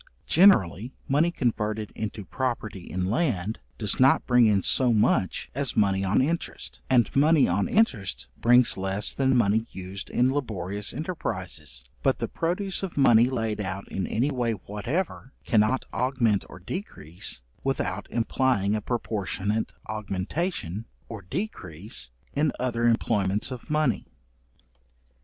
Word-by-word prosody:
Generally, 125 - +4
money 150 +5 +3
converted 110 -8 -1
into 110 -1 -5
property 110 -8 -3
in 95 +1 -2
land, 110 - 0 0.2
does 105 - -1
not 130 +1 +5
bring 125 -2 +5
in 100 -3 +3
so 125 -2 +3
much 105 -3 +1
as 140 0 -1
money 100 -2 +3
on 95 +6 +3
interest; 165 +4 -3
and 120 -5 +3
money 150 +1 +5
on 95 +3 +1
interest 115 - +1
brings 120 -1 +4
less 95 +2 -1
than 135 -1 +2
money 110 0 +2
used 95 +1 -7
in 125 +2 +2
laborious 105 -7 -3
enterprises: 90 - -5 0.2
but - - +2
the - - -2
produce 185 +3 -2
of 190 -5 -5
money 120 -3 +6
laid 115 -4 -2
out 95 0 -4
in 95 - -2
any 130 +7 0
way 120 -4 0
whatever, 120 - -4
cannot 110 +4 +2
augment 125 -6 +1
or - - -10
decrease 90 - -4 0.2
without 105 -8 -2
implying 115 -3 +1
a 105 - -2
proportionate 105 -2 -2 0.2
augmentation, 110 - -3 0.2
or 110 -3 -6
decrease 95 - -5 0.2
in 150 +1 +2
other 120 -2 0
employments 105 -2 +1
of 125 -2 -8
money. 150 -7 +1
110 Hz, 135 wpm, -26 LUFS, 100-130 Hz, 0.2 s, money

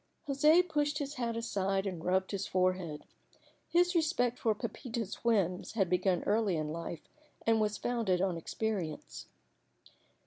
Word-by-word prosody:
José 305 +6 +5
pushed 295 -2 0
his 285 -1 -3
hat 235 -4 -2
aside 195 -4 0
and 180 -4 -4
rubbed 190 +1 +1
his 200 -1 -2
forehead. 185 -4 0 0.7
His 355 +1 +3
respect 310 -8 +1
for 220 -3 +2
Pepita's 230 -1 -5
whims 195 -6 +1
had 195 -6 +1
begun 180 0 +2
early 205 -4 +2
in 155 -1 -2
life 165 0 -6 0.4
and 225 -1 +3
was 210 0 0
founded 230 -7 0
on 185 -1 +1
experience. 170 -2 -4
210 Hz, 140 wpm, -32 LUFS, 185-245 Hz, 0.7 s, José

